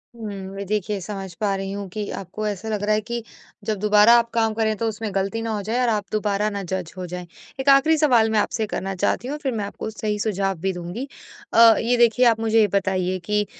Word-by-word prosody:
हुँ, 200 -4 -7
व - - -3
देखिए 210 -1 -1
समझ 195 0 -6
पा 200 +1 0
रही 195 0 -4
हूँ 200 0 -5
कि 210 +2 -5
आपको 195 +3 -6
ऐसा 205 +2 -4
लग 210 -2 -2
रहा 210 +1 +2
है 215 - 0
कि 235 +1 -5 0.4
जब 215 -1 -1
दोबारा 210 +2 +6
आप 235 0 -2
काम 225 -1 +1
करें 220 -1 0
तो 230 +1 -1
उसमें 220 0 -3
गलती 195 +4 -1
ना 225 - -3
हो 205 - -3
जाए 225 +5 -2
और 245 - +2
आप 210 -2 0
दोबारा 210 0 0
ना 200 -1 -4
जज 185 -2 -4
हो 180 - -4
जाएँ, 180 0 -7 0.3
1 265 - +1
आखिरी 295 +4 +5
सवाल 245 -7 +4
मैं 220 - +2
आपसे 220 +1 0
करना 195 +1 -2
चाहती 215 +6 0
हूँ 275 - -3
और - - -8
फिर 265 - 0
मैं 215 -4 -2
आपको 200 - -6
सही 210 -1 -3
सुझाव 195 -3 -1
भी 190 +1 -1
दूँगी। 180 +9 -6 0.5
अ, 230 -1 +8
ये 240 +2 +1
देखिए 240 +1 +4
आप 230 -2 +4
मुझे 225 0 +2
ये 210 - +5
बताइए 185 -1 0
कि 210 +1 +1
210 Hz, 245 wpm, -23 LUFS, 195-225 Hz, 0.5 s, अ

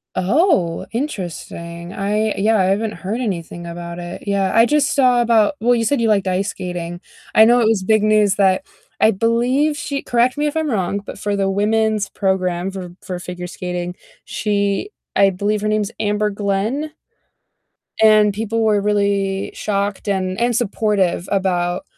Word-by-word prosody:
Oh, 190 - +1
interesting, 175 - -5
I 210 +2 0
yeah, 220 +3 +2
I 190 - +3
haven't 210 +3 0
heard 205 +5 -4
anything 175 -6 -4
about 170 0 -7
it, 175 0 -7
yeah, 200 -1 0
I 230 +1 +6
just 295 +3 +1
saw 250 -3 +4
about 230 +2 +3
well, 245 +2 +3
you 230 -1 0
said, 270 +2 +1
you 230 - +2
liked 200 -2 +2
ice 190 +2 0
skating. 175 -2 -5 0.3
I 220 - +8
know 240 +2 +5
it 235 - +3
was 220 -4 +1
big 215 +2 +3
news 215 -2 +3
that 190 -2 +2 0.3
I 220 - +5
believe 245 +8 +1
she 280 -1 -3
correct 245 +1 +1
me 295 0 +1
if 295 - -3
I'm 315 -3 0
wrong, 200 -2 -1
but - - -8
for 205 -1 -1
the 195 -1 0
women's 215 +1 +1
program 185 -2 -1
for 180 -2 -8
for 180 -1 -5
figure 180 0 -7
skating, 180 0 -5 0.3
she 200 - -1 0.3
I 195 - +5
believe 205 +3 -1
her 215 - -1
name's 215 0 0
Amber 210 0 0
Glenn. 205 +9 -2 1.1
And 215 -1 +5
people 225 +2 -1
were 210 -2 +3
really 200 -1 0
shocked 200 0 -2
and 190 -1 -1
and 240 0 +1
supportive 205 -5 0
about 180 0 0
205 Hz, 170 wpm, -19 LUFS, 185-225 Hz, 1.1 s, I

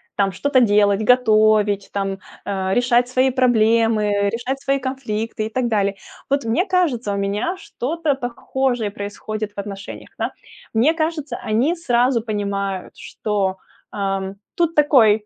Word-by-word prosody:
там 195 -1 +1
что-то 275 +7 +2
делать, 205 -2 +3
готовить 215 -4 +3
там, 195 -1 -2 0.3
а, 190 -1 -1
решать 245 0 +3
свои 255 +1 +2
проблемы, 225 -4 +3
решать 250 +5 -3
свои 275 0 +1
конфликты 230 -4 -3
и - - -8
так 245 +1 -1
далее. 200 -3 +1 0.3
Вот 280 0 +1
мне 235 +12 +1
кажется, 285 - +1
у 200 - -2
меня 205 - -1
что-то 320 -2 -2
похожее 245 -2 -2
происходит 210 +1 -5
в - - -44
отношениях, 200 0 -7
да. - - -1 0.4
Мне 255 +9 +4
кажется, 315 -5 -2
они 245 +11 +1
сразу 250 -6 +2
понимают, 200 -3 -3
что, 195 -3 -2 0.3
ам, 195 -1 -2 0.2
тут 335 -1 +1
такой 225 -8 +5
225 Hz, 140 wpm, -21 LUFS, 205-260 Hz, 0.4 s, такой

